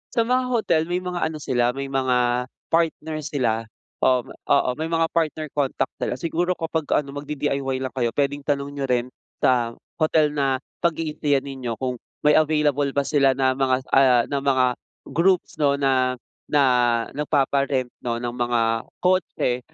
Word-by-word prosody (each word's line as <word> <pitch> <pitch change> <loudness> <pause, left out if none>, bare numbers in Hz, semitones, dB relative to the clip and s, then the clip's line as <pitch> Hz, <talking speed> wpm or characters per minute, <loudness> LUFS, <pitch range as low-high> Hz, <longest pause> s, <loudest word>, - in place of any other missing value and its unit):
Sa 230 - +4
mga 255 +2 +1
hotel, 220 -10 +2
may 180 +1 -2
mga 180 -1 -3
ano 160 0 -1
sila, 125 -4 0
may 135 0 -5
mga 125 -2 +1 0.2
partner 160 -1 0
sila, 120 -7 -1 0.3
oo 125 -2 +3
ma - - -14 0.2
oo, 140 -2 +3
may 160 - -1
mga 165 0 +1
partner 155 -2 -1
contact 135 -2 -1
sila. - - -1
Siguro 175 +1 -1
kapag 160 -2 -3
ano, 140 -2 -1
mag-di-DIY 140 -2 -2
lang 130 - -3
kayo, 120 -3 -1
pwedeng 145 0 0
tanong 140 -1 -1
niyo 140 -1 -3
rin 125 0 0 0.3
sa 120 -2 +2 0.2
hotel 155 -1 +3
na 135 -2 0 0.2
pag-i-stayan 155 -4 0
ninyo 130 -4 -5
kung 125 0 -3 0.2
may 150 +1 +6
available 150 -2 +2
ba 140 - +2
sila 140 -2 +3
na 130 -1 +2
mga, 130 0 +1
ah, 125 -3 +5
na 140 - +1
mga 135 -2 +2 0.5
groups 180 0 +1
'no 140 -1 +3
na, 130 -2 +1 0.3
na 145 -1 +3 0.5
nagpapa-rent 140 -3 0
'no 120 -1 -2
ng 120 0 -3
mga 120 -1 0 0.4
kotse 180 -9 +1
140 Hz, 160 wpm, -23 LUFS, 130-155 Hz, 0.5 s, may